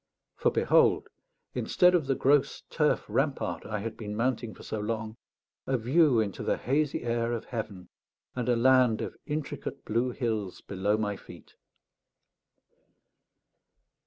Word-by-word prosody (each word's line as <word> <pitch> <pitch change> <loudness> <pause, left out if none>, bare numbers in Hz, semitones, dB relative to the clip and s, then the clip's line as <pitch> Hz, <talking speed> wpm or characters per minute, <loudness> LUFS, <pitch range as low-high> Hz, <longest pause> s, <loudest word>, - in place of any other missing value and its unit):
For - - +2
behold, - - +3 0.4
instead 180 0 +3
of 165 -6 +2
the 135 - +2
gross 140 +2 +2
turf - - +1
rampart - - -1
I 105 -2 -3
had 110 +1 -4
been 105 -2 -5
mounting 115 -1 -1
for - - -13
so 110 - -4
long, 110 +1 -3 0.5
a 130 - +2
view 130 +2 +4
into 105 -3 -2
the - - 0
hazy 145 +4 0
air 115 0 0
of 115 - -4
heaven, 110 -6 -6 0.5
and 125 -1 -2
a 120 - +4
land 125 -2 +4
of - - -5
intricate 150 -1 -4
blue 115 +4 +1
hills 110 -7 -3
below 100 +2 0
my 105 -2 -2
feet. - - -14
115 Hz, 140 wpm, -29 LUFS, 110-130 Hz, 0.5 s, view